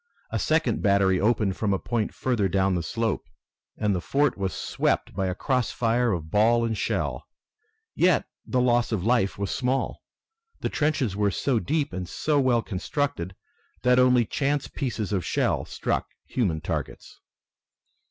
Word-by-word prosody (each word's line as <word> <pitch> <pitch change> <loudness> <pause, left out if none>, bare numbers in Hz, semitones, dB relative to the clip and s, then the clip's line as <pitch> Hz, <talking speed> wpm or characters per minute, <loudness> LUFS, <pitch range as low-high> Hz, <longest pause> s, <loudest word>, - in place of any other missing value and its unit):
A - - -1
second 160 +1 +1
battery 100 -2 +3
opened 105 -3 +1
from 105 -3 +1
a - - +2
point 115 +1 -2
further 115 -7 0
down 95 +1 +2
the 90 - 0
slope, 115 +5 -2 0.5
and 105 -2 +1
the 90 - -1
fort 145 +8 +1
was 95 -1 -2
swept - - -1
by 95 - -1
a 90 - -2
cross 125 +3 0
fire 120 0 +1
of 80 -4 -3
ball 115 +3 +4
and 115 -1 -1
shell. - - -2 0.7
Yet 180 -4 +3 0.2
the 125 - 0
loss 120 -1 +2
of 105 -6 -1
life 115 -3 +2
was 100 -1 -2
small. 130 +1 -1 0.6
The - - -1
trenches 145 -9 0
were 105 0 +2
so 120 +5 0
deep 145 -1 -1
and 90 -1 -4
so 150 -2 +1
well 125 -4 +3
constructed 95 - -3 0.5
that 125 0 +5
only 125 -2 +5
chance 140 +4 -1
pieces 110 -6 -3
of 95 -3 0
shell - - 0
struck - - -2 0.2
human 90 -11 -1
targets. 80 -4 -5
115 Hz, 160 wpm, -26 LUFS, 95-125 Hz, 0.7 s, that